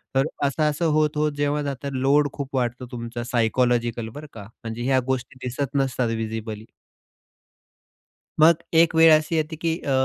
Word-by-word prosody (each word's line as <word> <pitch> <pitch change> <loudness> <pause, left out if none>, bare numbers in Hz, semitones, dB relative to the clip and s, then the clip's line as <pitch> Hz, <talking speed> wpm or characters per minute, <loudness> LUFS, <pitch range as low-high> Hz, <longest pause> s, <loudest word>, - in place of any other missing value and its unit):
तर 135 +3 +3 0.2
असं-असं 150 +3 0
होत 150 -1 +1
होत 150 0 +1
जेव्हा 145 +1 0
जातं, 140 0 -4
लोड 140 +3 +2
खूप 140 -1 -6
वाढतो 125 0 -1
तुमचा 120 0 -5
सायकॉलॉजिकल, 120 -1 0
बरं 150 +1 -8
का, 105 -3 -9 0.2
म्हणजे 115 +1 -5
ह्या 130 0 +3
गोष्टी 130 0 -3
दिसत 135 +3 -3
नसतात 130 -3 0
व्हिजिबली. 110 -1 -5 1.7
मग 165 +1 +7 0.2
एक 165 0 +4
वेळ 160 0 +7
अशी 155 +2 -1
येते 160 0 -1
की 165 - 0
अ, 140 - -5
135 Hz, 155 wpm, -23 LUFS, 120-150 Hz, 1.7 s, मग